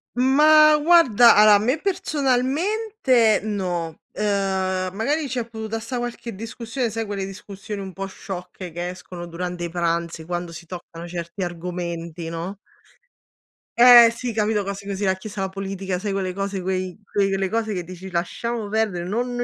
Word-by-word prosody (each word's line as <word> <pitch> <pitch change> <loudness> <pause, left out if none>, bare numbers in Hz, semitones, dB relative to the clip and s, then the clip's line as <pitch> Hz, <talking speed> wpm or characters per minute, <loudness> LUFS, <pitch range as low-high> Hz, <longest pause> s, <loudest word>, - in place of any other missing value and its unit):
Ma 300 +4 +6
guarda, 290 -8 +6
allora 210 0 +8
a - - +4
me 250 +7 +1
personalmente 285 - +1
no, 180 -6 -3 0.2
ehm, 190 -2 -1
magari 285 +9 0
c'è 250 -2 -2
potuta 220 0 -4
sta 235 +3 -5
qualche 240 -2 -5
discussione, 230 +2 -4
sai 225 -1 -3
quelle 200 -2 -3
discussioni 200 +1 -8
un 190 -1 -7
po' 195 +2 -4
sciocche 185 -1 -8
che 175 +2 -4
escono 180 -1 -8
durante 175 +1 -5
i 170 - -3
pranzi 170 -1 -1
quando 175 0 -4
si 165 0 -10
toccano 170 -1 -8
certi 170 +2 -6
argomenti, 170 -1 -5
no? 170 +4 -5 1.2
Eh 240 -1 +9
sì, 245 -2 -4
capito, 210 -1 +1
cose 200 0 -6
così, 200 0 -4
la 190 -1 +2
Chiesa, 200 +1 -7
la 190 - -1
politica, 195 -1 -4
sai 200 +2 -3
quelle 190 -2 -1
cose, 195 0 -3
quei 185 0 -2 0.2
quelle 195 -1 +1
cose 220 -1 -1
che 180 -2 -3
dici: 185 +2 -9
"Lasciamo 215 +6 -2
perdere, 210 -5 0
no 230 +5 0
non 245 -1 -3
195 Hz, 160 wpm, -23 LUFS, 180-230 Hz, 1.2 s, Eh